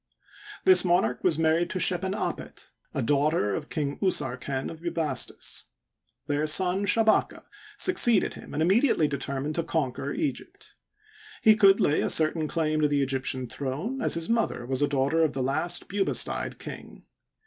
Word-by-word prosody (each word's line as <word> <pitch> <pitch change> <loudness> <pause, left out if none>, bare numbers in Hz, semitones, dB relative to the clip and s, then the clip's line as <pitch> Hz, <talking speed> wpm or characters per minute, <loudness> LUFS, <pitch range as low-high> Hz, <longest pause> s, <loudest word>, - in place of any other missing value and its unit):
This 375 -1 +7
monarch 180 +1 +1
was 170 -5 +2
married 160 +2 +1
to - - -3
Shep^en 185 +1 0
apet, - - -5 0.2
a 140 - -3
daughter 145 -4 +1
of 150 - -5
Kine 145 -3 -3
Usarken, 135 -7 -1
of 165 -1 -11
Bubastis. 160 -6 -3 0.6
Their 145 +1 -1
son, 185 +5 +2
Shabaka, 220 0 +2 0.3
suc 370 - +1
ceeded 230 -5 +4
him, - - -11
and 155 - +1
immediately 195 - +3
determined 140 +1 -3
to 170 - -1
conquer 140 -4 -2
Eg^t. 300 0 -5 0.7
He 215 -1 +7
could 195 -2 +5
lay 145 - +2
a - - -1
certain 155 0 +2
claim 155 -1 -1
to 150 - +3
the 145 -1 +1
Egyptian 130 -1 -2
throne, 145 - -4
as - - +2
his 165 0 -3
mother 230 - -1
was 130 +2 -2
a 145 - +3
daughter 140 +3 +1
of 155 -3 +1
the 130 - -2
last 170 +7 -1
Bubastide 200 0 0
King. - - -10
155 Hz, 160 wpm, -26 LUFS, 140-185 Hz, 0.7 s, This